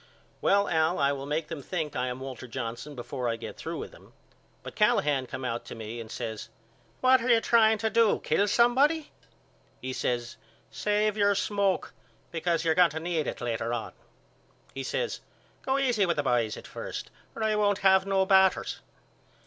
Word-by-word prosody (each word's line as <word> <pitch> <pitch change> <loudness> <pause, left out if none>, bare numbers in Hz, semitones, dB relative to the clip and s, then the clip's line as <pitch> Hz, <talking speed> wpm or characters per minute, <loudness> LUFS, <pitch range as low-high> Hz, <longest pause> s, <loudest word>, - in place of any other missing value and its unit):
Well 200 0 +3
Al 160 +1 +2
I 140 -1 +2
will 140 0 -5
make 150 +2 -2
them 160 -3 -6
think 155 -1 -4
I 125 0 -1
am 125 +1 -5
Walter 130 -1 -7
Johnson 120 +4 -5
before 125 0 -4
I 115 - 0
get 115 - -8
through - - -5
with - - -6
them. - - -18 0.5
But - - -8
Callahan 140 -3 +2
come 130 - -6
out 115 -1 -2
to - - -8
me 115 +1 -7
and 110 - -10
says 110 -1 -5 0.5
What 255 0 +5
are 245 - -2
you 235 -1 +6
trying 220 -1 +4
to 220 +1 0
do 230 -1 +3
kill 205 - +2
somebody? 270 +8 +3 0.7
He 130 0 -5
says 120 -1 -2 0.3
Save 210 0 0
your 205 -1 +3
smoke 200 -1 0 0.4
because 170 0 -1
you're 160 - +4
going 180 0 +5
to 155 +2 -5
need 165 -2 -2
it - - -5
later 115 -1 -2
on. 115 - -5 0.8
He 135 - -5
says 475 - -2 0.4
Go 265 0 0
easy 245 -8 +2
with 170 -2 0
the 145 - +1
boys 120 -5 +1
at - - -10
first - - -7 0.2
or 225 - -3
I 215 -1 +2
won't 205 -1 +2
have 190 0 +5
no 195 -1 +2
batters. 190 -1 +3
170 Hz, 190 wpm, -28 LUFS, 130-210 Hz, 0.8 s, you